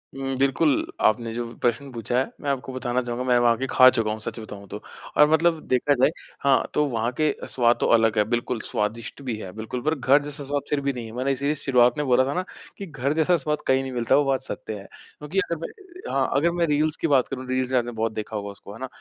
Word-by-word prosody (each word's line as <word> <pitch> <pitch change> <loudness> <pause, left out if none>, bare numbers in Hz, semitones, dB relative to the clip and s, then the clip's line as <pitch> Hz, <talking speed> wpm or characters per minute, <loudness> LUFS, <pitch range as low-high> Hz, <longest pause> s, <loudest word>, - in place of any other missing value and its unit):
उम, 135 -1 -3
बिल्कुल, 140 +2 +2 0.2
आपने 115 +1 +2
जो 120 0 -3 0.2
प्रश्न 125 +3 0
पूछा 120 +1 -2
है, 130 - -1
मैं 145 - -2
आपको 130 -1 -3
बताना 125 -1 -1
चाहूँगा 120 +1 -4
मैं 125 -1 +4
वहाँ 120 -1 +4
आ - - -2
के 135 +1 -2
खा 130 0 +8
चुका 115 -4 0
हूँ, 110 - -4
सच 110 - -6
बताऊँ 100 -2 -9
तो - - -7 0.4
और 150 0 +7
मतलब 165 0 +3
देखा 130 +3 +2
जाए 130 +2 +4 0.3
हाँ, 140 -1 +4
तो 150 - +2
वहाँ 115 0 -1
के 155 -1 +3
अ, - - -8
स्वाद 120 -1 +2
तो - - +1
अलग 115 -1 +2
है, 105 - +5
बिल्कुल 120 0 -1
स्वादिष्ट 110 +6 -3
भी 125 -5 -3
है 95 -4 -7
बिल्कुल 110 +3 -5
पर 155 +1 +1
घर 135 +2 +4
जैसा 145 -1 -7
स्वाद 145 +1 -2
फिर 145 -1 0
भी 140 0 -1
नहीं 120 -2 -6
है। 110 - -9
मैंने 130 +2 0
इसीलिए 140 +3 0
शुरुआत 125 -3 +3
में 150 - -1
बोला 130 +1 +4
था 140 - -2
ना, 180 +1 -1 0.3
कि 200 - -6
घर 145 -3 -2
जैसा 165 +2 +3
स्वाद 150 +1 -2
कहीं 130 0 +3
नहीं 130 - -5
मिलता, 120 +1 +2
वो 145 - +4
बात 135 -1 +1
सत्य 110 - -6
है। 100 - -12 0.3
क्योंकि 150 +6 -2
अगर 170 -4 -1
मैं - - -7 0.4
हाँ, 135 -1 +1
अगर 165 +5 +3
मैं 170 -1 +1
रील्स 150 +1 +1
की 165 - -1
बात 135 -4 +3
करूँ, 130 -1 -6
रील्स 130 0 -1
से 130 - +2
आपने 120 0 0
बहुत 110 -1 -1
देखा 110 0 -5
होगा 100 -1 -4
उसको 100 0 -12
है 115 - -11
ना? 130 - -4
130 Hz, 265 wpm, -24 LUFS, 120-145 Hz, 0.4 s, खा